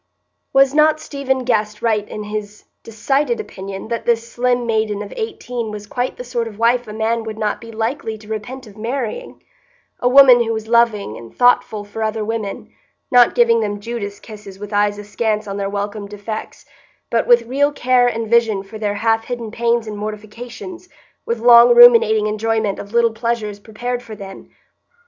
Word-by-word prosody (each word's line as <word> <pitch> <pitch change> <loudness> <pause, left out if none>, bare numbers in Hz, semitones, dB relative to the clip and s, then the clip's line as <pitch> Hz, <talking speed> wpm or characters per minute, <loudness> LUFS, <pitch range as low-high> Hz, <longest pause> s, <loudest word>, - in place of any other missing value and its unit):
Was 270 0 +4
not 310 +1 +4
Stephen 265 -3 -2
Guest 215 -3 -1
right 215 -3 0
in 210 - -6
his 210 0 -6 0.2
decided 270 - -1
opinion 195 - -7
that 235 -1 -3
this 230 -1 +1
slim 245 0 0
maiden 220 -2 -1
of 205 - -10
eighteen 250 - -4
was 210 -1 -7
quite 245 +4 -3
the - - -6
sort 240 -2 -3
of 210 -2 -10
wife 240 +1 +2
a - - -7
man 225 +1 -1
would 220 -1 -6
not 210 -1 -2
be 230 0 -10
likely 225 0 -3
to 210 0 -16
repent 245 +5 -6
of 210 -2 -15
marrying,—a 265 - -5
woman 255 -2 +8
who 225 0 -2
was 220 0 -5
loving 225 - +2
and 115 -1 -13
thoughtful 245 -4 +3
for 205 +2 -8
other 220 0 -1
women, 220 -2 -5 0.4
not 245 -1 +5
giving 235 -1 +4
them 205 -2 -2
Judas 205 -2 -6
kisses 210 -3 -11
with 205 +1 -8
eyes 205 0 +1
askance 210 +1 -2
on 195 0 -5
their 200 -1 -2
welcome 205 +1 -4
defects, 210 +2 -7 0.5
but 230 - +1
with 240 -1 +5
real 280 +5 +1
care 250 -3 +2
and 230 -1 -2
vision 225 -3 +2
for 215 +2 -10
their 205 -1 -1
half 225 +1 +1
hidden 235 -3 -5
pains 235 0 0
and 215 -1 -6
mortifications, 230 - -8 0.4
with 235 - -1
long 235 +1 +7
ruminating 230 -3 +7
enjoyment 215 -1 -1
of 200 - -9
little 235 -1 +2
pleasures 220 -3 -3
prepared 240 +4 -5
for 225 -3 -10
them? 195 -1 -11
225 Hz, 180 wpm, -19 LUFS, 210-240 Hz, 0.5 s, woman